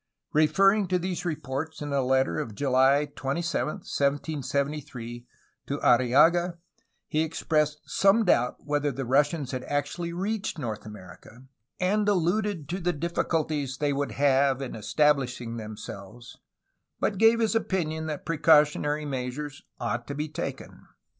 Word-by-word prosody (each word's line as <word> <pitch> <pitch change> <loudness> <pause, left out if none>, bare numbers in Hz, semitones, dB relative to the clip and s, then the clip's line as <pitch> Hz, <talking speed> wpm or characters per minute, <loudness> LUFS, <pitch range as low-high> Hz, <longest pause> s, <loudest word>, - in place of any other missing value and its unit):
Referring 195 +6 +4
to 180 0 +1
these 180 0 -3
reports 155 -1 -4
in 145 -1 -4
a 140 - +2
letter 130 -9 +1
of 110 - -5
July 135 +3 +3
27, 155 +5 -1 0.2
1773, 140 -4 -2 0.4
to 140 - -2
Arriaga, 150 +9 +4 0.5
he 155 - 0
expressed 155 -1 0
some 200 +3 +3
doubt 125 -8 +3
whether 145 0 0
the 135 +1 -4
Russians 145 +2 +1
had 130 -1 -4
actually 145 +4 -2
reached 195 +4 -3
North 110 -6 -5
America, 105 +4 -12 0.4
and 205 +3 +2
alluded 185 -2 0
to 180 +5 -3
the 175 -1 0
diffi 170 +3 -2
culties 150 -5 -1
they 145 -1 0
would 140 +1 -2
have 135 -1 +3
in 135 -2 -5
establishing 125 0 0
themselves, 110 +1 -9 0.6
but 200 - -1
gave 225 +1 +5
his 225 -1 +2
opinion 160 -8 -1
that 150 -2 -5
precautionary 150 -1 +3
measures 135 +1 -4 0.2
ought 120 +1 -3
to 140 - -5
be 150 +2 -2
taken. 155 - -7
145 Hz, 135 wpm, -27 LUFS, 130-170 Hz, 0.6 s, gave